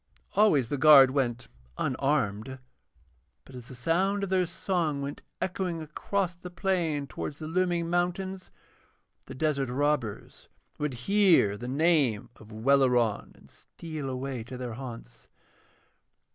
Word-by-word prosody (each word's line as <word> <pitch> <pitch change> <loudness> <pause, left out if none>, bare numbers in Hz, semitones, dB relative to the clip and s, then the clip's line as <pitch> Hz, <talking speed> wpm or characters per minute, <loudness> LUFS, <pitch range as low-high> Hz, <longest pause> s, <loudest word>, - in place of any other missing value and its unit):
Always 150 - +3
the 145 - -2
guard 135 -2 +8
went 120 -4 -1 0.3
unarmed, 130 -3 -1 0.9
but 135 - -15
as 125 -2 -10
the 130 - -10
sound 185 +10 0
of 200 - -2
their 185 -2 +2
song 170 -5 -1
went 140 +1 -6 0.2
echoing 180 -2 -2
across 180 +4 -2
the 180 +1 -10
plain 175 -6 -1
towards 140 +3 -6
the 155 - -7
looming 175 0 0
mountains, 180 +2 -2 0.8
the - - -8
desert 140 -2 0
robbers 135 -5 -2 0.3
would 150 -3 -2
hear 195 - +4
the 120 +4 -7
name 140 -6 +1
of 110 0 -15
Welleran 125 -1 +2
and - - -20
steal 155 -5 -8
away 130 -2 -4
to 125 +1 -8
their 125 -2 -5
haunts. 115 - -10
145 Hz, 130 wpm, -28 LUFS, 125-175 Hz, 0.9 s, guard